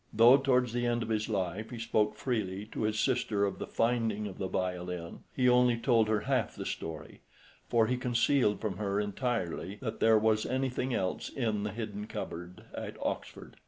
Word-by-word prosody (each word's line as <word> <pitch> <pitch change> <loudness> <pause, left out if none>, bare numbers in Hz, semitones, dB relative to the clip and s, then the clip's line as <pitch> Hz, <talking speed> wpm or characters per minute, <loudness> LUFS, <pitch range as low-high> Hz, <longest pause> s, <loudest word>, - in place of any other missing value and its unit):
Though 120 +5 +7
towards 125 -3 +2
the 120 0 0
end 120 -1 +1
of 115 - -6
his 110 0 0
life 100 +1 -2
he 120 - -7
spoke 110 -2 +1
freely 105 -4 -2
to - - -4
his 110 0 0
sister 110 -6 +1
of 100 - -3
the - - -4
finding 115 -3 0
of 100 -3 -7
the 95 - -1
violin, 90 -2 -3 0.2
he 125 -1 +3
only 125 -1 +5
told 115 -2 +3
her 110 -1 +1
half - - 0
the - - -6
story, 80 -2 -6 0.5
for 115 -2 +4
he 125 +3 0
concealed 125 -3 +2
from 105 -4 -3
her 100 -1 -1
entirely 105 -3 -2
that 110 -3 -4
there 110 -1 +5
was 110 0 +2
anything 130 0 -1
else 95 -6 -1
in 110 -6 -1
the 105 0 -2
hidden 105 -1 -5
cupboard 90 -2 -6
at - - -6
Oxford. - - -5
110 Hz, 190 wpm, -31 LUFS, 100-120 Hz, 0.5 s, Though